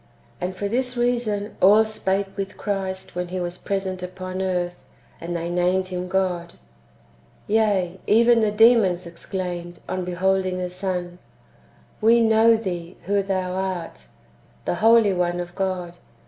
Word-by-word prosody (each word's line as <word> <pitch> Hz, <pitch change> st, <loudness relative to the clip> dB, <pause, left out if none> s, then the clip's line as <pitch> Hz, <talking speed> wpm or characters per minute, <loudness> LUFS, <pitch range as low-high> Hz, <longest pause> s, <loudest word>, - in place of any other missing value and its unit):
And 185 Hz, +1 st, -3 dB
for 200 Hz, +2 st, -2 dB
this 250 Hz, +3 st, -1 dB
reason 235 Hz, -4 st, 0 dB
all 210 Hz, +3 st, +7 dB
spake 195 Hz, -2 st, -2 dB
with 195 Hz, 0 st, -5 dB
Christ 190 Hz, -2 st, -3 dB
when 180 Hz, 0 st, -2 dB
He 185 Hz, +1 st, -4 dB
was 175 Hz, 0 st, -4 dB
present 190 Hz, -2 st, -3 dB
[upon 185 Hz, +1 st, -5 dB
earth], 180 Hz, -2 st, -2 dB, 0.4 s
and 175 Hz, +1 st, -4 dB
they 170 Hz, 0 st, -2 dB
named 180 Hz, +2 st, +1 dB
Him 180 Hz, 0 st, -4 dB
God. 180 Hz, -2 st, -1 dB, 0.9 s
Yea, 200 Hz, -4 st, +1 dB
even 235 Hz, +2 st, +5 dB
the 215 Hz, -, +3 dB
demons 210 Hz, -5 st, +4 dB
exclaimed, 175 Hz, 0 st, -5 dB
on 185 Hz, -, -2 dB
beholding 185 Hz, +1 st, 0 dB
the 180 Hz, -1 st, -3 dB
Son: 180 Hz, -1 st, -4 dB, 0.4 s
" -, -, -31 dB
We 230 Hz, +2 st, +5 dB
know 225 Hz, 0 st, +5 dB
thee 180 Hz, -5 st, -5 dB
who 200 Hz, +2 st, +2 dB
thou 190 Hz, -2 st, -2 dB
art, 185 Hz, -3 st, -4 dB, 0.6 s
the -, -, 0 dB
Holy 225 Hz, -2 st, +6 dB
One 175 Hz, -1 st, 0 dB
of 175 Hz, 0 st, -5 dB
God." 180 Hz, -3 st, -3 dB
190 Hz, 145 wpm, -23 LUFS, 180-205 Hz, 0.9 s, all